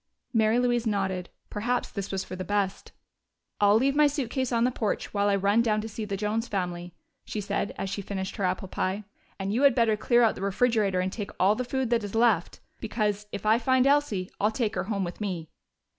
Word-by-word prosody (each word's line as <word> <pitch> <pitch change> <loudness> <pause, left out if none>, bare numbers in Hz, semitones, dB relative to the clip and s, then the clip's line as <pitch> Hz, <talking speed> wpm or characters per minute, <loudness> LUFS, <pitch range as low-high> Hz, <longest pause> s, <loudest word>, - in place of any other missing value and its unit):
Mary 220 0 +3
Louise 240 -1 +1
nodded: 190 -4 -1 0.2
perhaps 240 +4 -1
this 200 -2 -5
was 195 -1 -2
for - - -7
the 185 - -4
best. 200 -1 -2 0.7
"I'll 205 0 +5
leave 270 +5 +3
my 300 0 +6
suitcase 260 -3 -2
on 230 -1 +2
the 250 - +3
porch 220 -3 -2
while 205 0 +2
I 200 - +3
run 200 +3 +3
down 215 -2 +1
to 220 - -5
see 220 0 -5
the 200 -1 -3
Jones 215 +3 -1
family," 175 -3 -3 0.3
she 215 - -5
said, 200 0 -2
as 195 - -3
she 200 +1 -3
finished 190 -1 -5
her 200 - -2
apple 185 +1 -1
pie. 190 +3 -2 0.3
"And 195 +1 -2
you 240 - +1
had 280 -3 +6
better 230 -3 +3
clear 240 +3 +3
out 225 - +4
the - - -9
refrigerator 200 -2 +2
and 185 +1 -2
take 205 -3 -5
all 195 +3 +5
the 250 - -2
food 255 0 -2
that 235 -2 +2
is 205 +1 -5
left, 225 -7 +2 0.2
because, 210 -2 -1
if 200 0 -6
I 220 +2 +4
find 260 +1 +3
Elsie, 275 -10 +2
I'll 210 - +3
take 220 -1 -1
her 185 0 -2
home 200 -2 -1
with 175 +3 -6
me." 175 -6 -4
210 Hz, 225 wpm, -27 LUFS, 195-235 Hz, 0.7 s, my